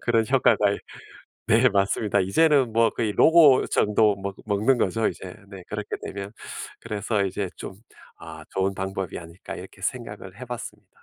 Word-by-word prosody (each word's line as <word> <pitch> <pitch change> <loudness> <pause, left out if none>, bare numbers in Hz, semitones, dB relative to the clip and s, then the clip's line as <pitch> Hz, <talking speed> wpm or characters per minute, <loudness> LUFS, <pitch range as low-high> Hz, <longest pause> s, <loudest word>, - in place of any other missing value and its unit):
그런 115 -2 +2
효과가 125 -4 +4 0.9
네 115 +4 +5
맞습니다. 100 +1 +1
이제는 130 - +3
뭐 115 0 +4
거의 110 -3 -2
로고 155 - +6
정도 105 -1 +2
먹 100 0 -5
먹는 110 +5 +2
거죠 115 -1 +1
이제 90 -1 -8
네 95 -3 -10
그렇게 105 -1 -4
되면. 100 +1 -6 0.5
그래서 105 -1 -2
이제 95 0 -3
좀 95 - -8 0.4
'아 80 -1 -10
좋은 95 +1 -1
방법이 95 -1 -4
아닐까.' 85 +1 -10
이렇게 - - -12
생각을 105 -5 -5
해봤습니다. 120 -2 -8
105 Hz, 320 characters per minute, -24 LUFS, 95-115 Hz, 0.9 s, 로고